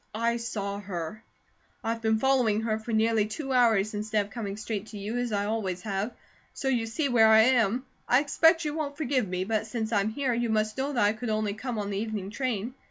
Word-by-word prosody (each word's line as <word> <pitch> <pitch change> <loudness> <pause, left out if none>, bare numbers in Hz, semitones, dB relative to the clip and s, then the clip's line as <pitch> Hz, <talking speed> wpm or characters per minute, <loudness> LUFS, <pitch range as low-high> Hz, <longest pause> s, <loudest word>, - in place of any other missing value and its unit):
I 235 +1 +1
saw 205 -4 -4
her. 185 +1 -6 0.6
I've 230 0 -2
been 220 -1 +2
following 240 -4 +2
her 220 -1 -1
for 220 +2 -6
nearly 220 -1 +2
two 270 +5 -4
hours 220 -5 +3
instead 210 0 0
of 200 - -16
coming 200 -2 -5
straight 215 -1 -4
to 215 - -9
you, 210 +4 -4
as 245 -1 -2
I 205 -1 0
always 200 -4 -2
have. 205 +2 -2 0.4
So 270 - -1
you 235 -4 +1
see 280 +7 -1
where 230 -4 +5
I 220 0 +7
am. 240 0 +3 0.2
I 250 - +6
expect 325 +3 +3
you 300 - -1
won't 295 -2 -3
forgive 265 -6 0
me, 180 0 -1
but 220 +2 -1
since 220 0 -3
I'm 205 -1 +2
here, 255 +2 -1
you 235 0 0
must 215 0 0
know 270 +2 -1
that 240 -5 +3
I 205 - +3
could 225 +1 -5
only 215 -1 0
come 230 +2 -4
on 205 -1 -3
the 195 - -1
evening 210 -3 -4
train." 240 -2 -2
220 Hz, 230 wpm, -28 LUFS, 210-245 Hz, 0.6 s, I